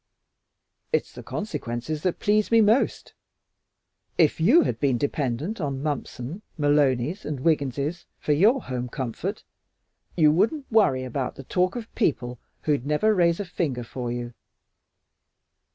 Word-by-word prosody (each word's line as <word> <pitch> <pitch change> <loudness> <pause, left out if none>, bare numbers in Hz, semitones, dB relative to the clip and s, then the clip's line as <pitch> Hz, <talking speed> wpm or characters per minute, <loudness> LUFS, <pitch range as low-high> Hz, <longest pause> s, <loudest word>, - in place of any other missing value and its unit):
"It's 470 - 0
the - - -9
consequences 150 - -4
that 180 0 0
please 210 0 +2
me 230 - +5
most. 220 +4 +2 1.0
If 160 -2 +3
you 270 - +6
had - - -2
been 135 -4 +2
dependent 145 - -2
on 140 -2 -3
Mumpson, 145 - -4 0.2
Malonys, 145 +2 +2
and 145 -4 -4
Wigginses 145 +2 0
for - - -2
your 220 - +4
home 125 -1 -4
comfort 125 -3 -4 0.7
you 155 -3 +6
wouldn't 265 - +1
worry 195 -13 +4
about 130 +1 -3
the 135 - -9
talk 180 - 0
of 230 -2 -7
people 125 - -1 0.2
who'd 145 -5 +1
never 150 +10 +2
raise 170 -2 +3
a 205 - -2
finger 145 -8 -2
for 120 +1 -5
you. 120 0 -4
150 Hz, 135 wpm, -25 LUFS, 130-190 Hz, 1.0 s, you